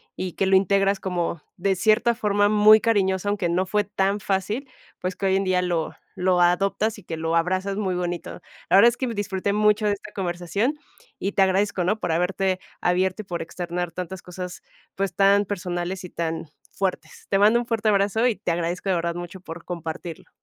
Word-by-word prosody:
y 185 -2 -4
que 195 - 0
lo 190 - +4
integras 195 0 +3
como 175 -3 -2 0.2
de 195 +1 +1
cierta 220 +5 +3
forma 205 -3 +2
muy 215 +1 +7
cariñosa, 200 -4 +1
aunque 200 -4 0
no 180 +2 +1
fue 205 +2 +1
tan 200 0 -1
fácil, 210 +8 -2 0.3
pues, 185 0 -3
que - - -3
hoy 190 0 +3
en 195 - +1
día 185 -1 +2
lo 175 -3 -1 0.2
lo 180 -1 +2
adoptas 195 +5 +2
y 205 - -13
que 165 - -4
lo 165 +1 0
abrazas 185 +3 0
muy 190 -4 -1
bonito. 175 -1 -4 0.3
La - - +5
verdad 230 +5 +8
es 240 - -6
que 260 - -2
me 235 - -3
disfruté 200 -1 -2
mucho 210 +1 +3
de 205 - +3
esta 205 +1 -9
conversación 190 - -2 0.4
y 195 - -2
te 195 - +1
agradezco, 190 -1 +1
¿no? 210 +4 +1
por 175 - -1
haberte 185 +2 0 0.2
abierto 185 +3 +1
y - - -14
por 175 -2 -4
externar 175 0 -4
tantas 185 +1 -6
cosas, 180 0 -7 0.3
pues, 195 0 -2
tan 200 +1 +4
personales 180 -1 -3
y 180 - -7
tan 160 -2 -4 0.2
fuertes. 180 -5 -3
Te 195 - +2
mando 215 +4 +5
un 240 - -3
fuerte 225 -2 -1
abrazo 205 +3 +3
y 235 - +1
te - - -2
agradezco 175 +3 -2
de 185 - +3
verdad 170 0 -1
mucho 175 +2 -7
por 165 -1 -9
compartirlo. 165 -1 -6
190 Hz, 205 wpm, -24 LUFS, 175-205 Hz, 0.4 s, verdad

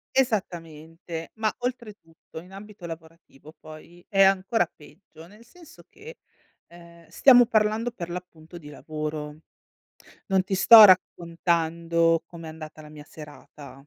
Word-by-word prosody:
Esattamente, 165 - -4
ma 220 -1 -1
oltretutto 215 -11 -8
in 180 +3 -16
ambito 200 -2 -12
lavorativo 160 -2 -13
poi 160 +3 -15
è 195 -3 +1
ancora 195 0 +2
peggio, 155 +2 -18
nel 210 +6 -18
senso 330 +7 -19
che, 470 +3 -14 0.5
ehm, 170 -1 -18
stiamo 245 -3 +5
parlando 220 +2 0
per 175 -8 -9
l'appunto 175 -1 -10
di 150 - -13
lavoro. 150 0 -7 0.9
Non 190 -2 0
ti 195 - -3
sto 220 +3 +9
raccontando 170 -2 +1
com'è 165 -2 -12
andata 155 -1 -11
la 150 - -14
mia 150 -1 -13
serata. 150 -1 -14
170 Hz, 125 wpm, -24 LUFS, 160-205 Hz, 0.9 s, sto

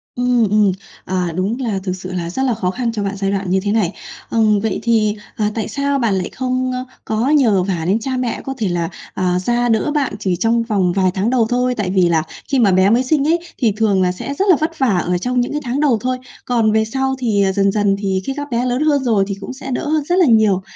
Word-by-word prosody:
Ừm, 245 -3 +2
ừm. 210 -1 +3 0.3
À, 180 -2 -2
đúng 200 +7 -1
là 210 -6 -1
thực 185 -2 -2
sự 185 0 -8
là 170 -2 -3
rất 265 +9 -2
là 255 - +2
khó 185 -5 -1
khăn 235 +2 -2
cho 210 -3 -3
bạn 200 0 -2
giai 195 0 -1
đoạn 195 -2 -2
như 190 - +2
thế 205 - 0
này. 205 -4 +1 0.4
Ừm, 215 -2 +3
vậy 220 -1 -2
thì, 215 -2 +2 0.2
ờ, 215 - 0
tại 220 - -2
sao 280 0 -1
bạn 225 -5 +1
lại 180 - -3
không, 255 0 -2
ơ, 255 0 -3 0.2
có 225 +5 0
nhờ 230 -11 +3
vả 175 -4 -2
đến 205 +4 +2
cha 260 +2 -3
mẹ 250 -2 -2
có 270 - -3
thể 220 -5 -1
là, 170 -1 -1 0.2
ờ, 180 -1 0
ra 240 +5 0
đỡ 225 +6 +1
bạn 285 -3 0
chỉ 190 -4 0
trong 230 +5 +1
vòng 200 -6 +1
vài 185 -2 +2
tháng 200 +4 0
đầu 250 -3 +2
thôi? 250 0 +1
Tại 205 -5 -2
vì 185 -2 +3
là 160 -2 +2 0.3
khi 275 - +3
mà 210 -5 +4
bé 185 +1 +4
mới 235 +4 +3
sinh 285 +2 +1
ấy, 335 +2 +3 0.2
thì 230 -5 +2
thường 210 -4 +2
là 180 -1 +2
sẽ 235 +9 -5
rất 380 +8 0
là 355 - +7
vất 320 0 -3
vả 225 -9 +2
ở 180 0 0
trong 250 +5 0
những 245 - -2
cái 300 0 -2
tháng 255 +2 -2
đầu 275 -7 +3
thôi, 255 +1 -1 0.3
còn 230 -3 +2
về 220 0 +2
sau 265 +3 -1
thì, 215 -5 +1
ờ, 190 - +2
dần 195 0 +2
dần 205 -1 +1
thì 190 -2 -1
khi 270 - -2
các 290 0 -5
bé 240 +1 0
lớn 250 +3 0
hơn 290 -3 +2
rồi 220 -6 +2
thì 200 - -3
cũng 225 - -6
sẽ 265 0 -7
đỡ 275 +4 -2 0.2
rất 350 - +3
là 360 - +6
nhiều. 220 -6 +4
220 Hz, 270 wpm, -18 LUFS, 195-255 Hz, 0.4 s, là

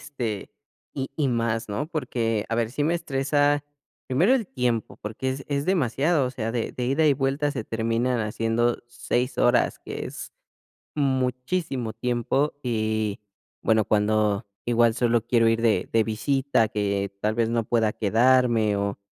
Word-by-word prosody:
este, 120 -8 -5 0.4
y 135 -1 -3
y 145 -4 +1
más, 115 -1 -1
¿no? 135 +9 -2
Porque, 115 -8 -1
a 115 - -1
ver, 115 -1 0
sí 145 +3 -1
me 165 +2 +2
estresa, 145 -1 +1 0.4
primero 175 - +4
el 230 -7 0
tiempo, 125 - -2
porque, 110 +5 -4
es 135 +1 -5
es 140 0 -1
demasiado, 150 - +2
o - - -3
sea, 115 -3 -3
de 115 -2 -2
de 125 - -3
ida 150 +4 +2
y 145 - +6
vuelta 140 +2 0
se 130 -6 -4
terminan 115 +2 0
haciendo 115 +2 0
6 125 +1 -2
horas, 120 0 +3
que - - -5
es - - -8 0.6
muchísimo 130 -1 -1
tiempo, 125 +4 0
que 110 -3 -1 0.4
bueno, 110 -1 +3
y, - - -6
cuando, 105 0 +1 0.2
que 120 - -2
igual 115 -1 +4
solo 120 -1 +2
quiero 115 -2 +3
ir 115 0 +2
de 110 -6 +2
de 115 -1 +4
visita, 125 +1 +1
que 100 -1 -1
tal 110 +1 0
vez 115 -1 +1
no 115 -1 0
pueda 110 -2 +1
quedarme 115 -1 +3
o 100 0 -2
120 Hz, 165 wpm, -25 LUFS, 110-135 Hz, 0.6 s, y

